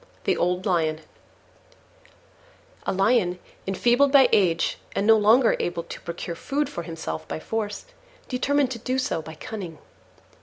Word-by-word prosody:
THE - - +2
OLD 180 +1 0
LION 160 -5 +1 1.9
A - - +2
Lion, 195 -2 +2 0.3
enfeebled 240 +8 +3
by 275 -2 +7
age 170 -5 +2 0.2
and 200 - 0
no 225 +1 +7
longer 225 +3 +5
able 175 -1 -2
to - - -9
procure 170 0 -5
food 285 - -1
for - - -5
himself 120 - -6
by 80 - -4
force, 210 - -4 0.4
determined 270 +1 +1
to 235 - -5
do 255 +3 -2
so 255 -10 -1
by 160 +1 -10
cunning. 180 -2 -7
195 Hz, 145 wpm, -25 LUFS, 170-245 Hz, 1.9 s, by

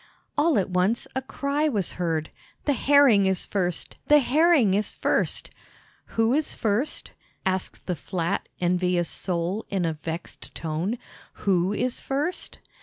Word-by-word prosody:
All 305 -1 +3
at 190 -2 0
once 185 +6 +1
a 265 - 0
cry 280 +3 -1
was 205 - 0
heard, 165 -3 -2 0.3
"The 290 - +3
Herring 265 -7 +5
is 190 -2 0
first, 180 -4 -2
the 295 - +7
Herring 295 - +4
is 210 +2 +1
first!" - - 0 0.7
"Who 225 +2 +4
is 305 +2 0
first?" 230 +7 -1 0.3
asked 190 0 -2
the 180 - -1
flat, 175 +3 -2
envious 180 -1 +1
Sole 180 +3 -2
in 190 -3 0
a 165 - 0
vexed 160 +2 -7
tone. 165 +8 -2 0.5
"Who 185 -1 +2
is 250 +4 -1
first?" 290 +6 -2
200 Hz, 140 wpm, -25 LUFS, 180-270 Hz, 0.7 s, the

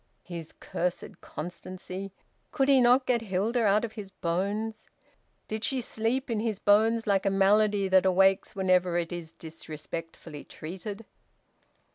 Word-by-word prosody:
His 170 -3 -7
cursed 180 0 -4
constancy!... 185 +3 -7 0.4
Could 270 -2 +1
he 270 -2 +6
not 250 +2 +5
get 245 -2 +2
Hilda 220 +4 0
out 210 +2 +3
of 225 - -7
his 210 -3 -8
bones? 200 +5 -3 0.6
Did 220 0 -4
she 265 +2 0
sleep 240 +2 -1
in 230 -4 -1
his 220 -2 -1
bones 220 +3 +3
like 200 -3 +2
a - - +5
malady 200 +1 +3
that 190 0 +4
awakes 190 +2 +3
whenever 185 -2 +2
it 170 0 -2
is 170 -2 -6
disrespectfully 160 -1 -8
treated? 200 +6 -8
195 Hz, 140 wpm, -28 LUFS, 180-225 Hz, 0.6 s, he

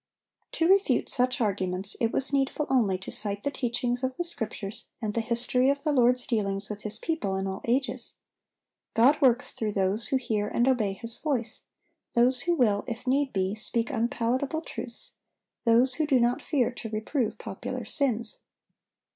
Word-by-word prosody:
To 330 - +2
refute 390 +2 +3
such 255 +1 +1
arguments 195 -3 -1
it 230 -1 +2
was 270 +1 -1
needful 275 +2 +1
only 215 -8 +3
to 190 - -8
cite 205 -1 -3
the 285 - 0
teachings 245 -1 -1
of 260 0 -2
the 350 - 0
Scriptures 225 - -3
and 215 -3 -3
the 230 - 0
history 245 +3 +1
of 280 0 0
the 305 - +1
Lord's 250 -2 +3
dealings 200 -3 -1
with 210 0 -6
His 215 0 -2
people 270 -10 -2
in 190 0 -2
all 190 0 -4
ages. 260 +3 -1 0.8
God 265 +7 +5
works 250 -3 +3
through 215 -2 -3
those 195 +3 +1
who - - 0
hear 220 -5 -1
and 240 +4 +1
obey 225 -7 +2
His 230 +4 -3
voice, 250 -7 -2 0.5
those 245 +1 +5
who 345 0 +1
will, 210 -8 +2
if 240 +1 -5
need 270 +1 +1
be, 190 0 0
speak 230 +2 -1
unpalatable 250 +5 0
truths, 290 - -7 0.5
those 240 +3 +5
who 310 +3 0
do 270 -4 +4
not 240 +1 +2
fear 255 -6 +1
to 235 -2 -7
reprove 220 +4 -2
popular - - -5
sins. 235 -6 -1
240 Hz, 175 wpm, -27 LUFS, 215-265 Hz, 0.8 s, God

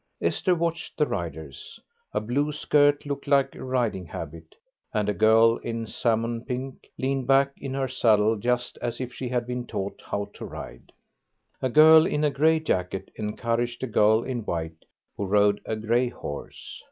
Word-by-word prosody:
Esther 185 -2 +1
watched 165 -1 -3
the 150 - +3
riders. 80 - -6 0.3
A - - 0
blue 135 +8 -1
skirt 145 -1 +2
looked 140 -1 -5
like 140 -1 +3
a - - -9
riding 120 -8 -1
habit, 80 +1 -8 0.4
and 105 -1 +1
a 105 - +1
girl 110 +2 +5
in 115 -1 -4
salmon 115 +1 -1
pink 130 +1 -6
leaned 135 -1 -1
back 135 0 +4
in 135 -1 -6
her 135 -1 0
saddle 110 -3 +3
just 120 +3 -2
as 120 0 -3
if 125 -1 -5
she 125 0 -5
had 120 -1 -1
been 125 0 -4
taught 100 0 -4
how 100 0 -3
to - - -10
ride. - - -9 0.7
A 130 - 0
girl 155 +4 +7
in 150 - -1
a 150 - +3
grey 160 +3 +3
jacket 95 - -2
encouraged 115 +3 -2
a - - +2
girl 110 0 +3
in 125 -2 -3
white 80 -4 -4 0.3
who 100 - -2
rode 105 +1 +3
a 110 - -1
grey 120 +3 +1
horse. 75 - -8
120 Hz, 175 wpm, -26 LUFS, 105-135 Hz, 0.7 s, girl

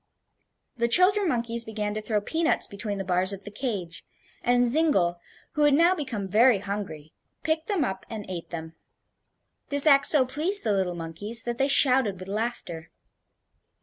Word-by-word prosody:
The 235 0 0
children 370 - +4
monkeys 235 -2 -1
began 210 -2 -4
to 215 - -5
throw 210 -1 -2
peanuts 320 +9 0
between 200 0 -6
the 195 - -4
bars 185 +1 0
of 195 0 -9
the 205 - -10
cage, 200 -8 -5 0.4
and 245 0 +2
Zingle, 235 - +1 0.3
who 300 - -3
had 295 -1 +4
now 340 +4 +4
become 260 - -5
very 225 +4 +3
hungry, 190 -7 -7 0.3
picked 315 0 -2
them 385 -9 0
up 190 -4 -6
and 215 -3 -7
ate 180 -3 -6
them. 160 -1 -8 1.0
This 285 0 +6
act 280 -2 +5
so 285 -4 +5
pleased 315 +10 +2
the 215 - 0
little 185 -3 -1
monkeys 190 +8 -1
that 240 0 -5
they 270 - +2
shouted 255 -8 +3
with 185 - -10
laughter. 205 -6 -5
225 Hz, 170 wpm, -25 LUFS, 195-280 Hz, 1.0 s, This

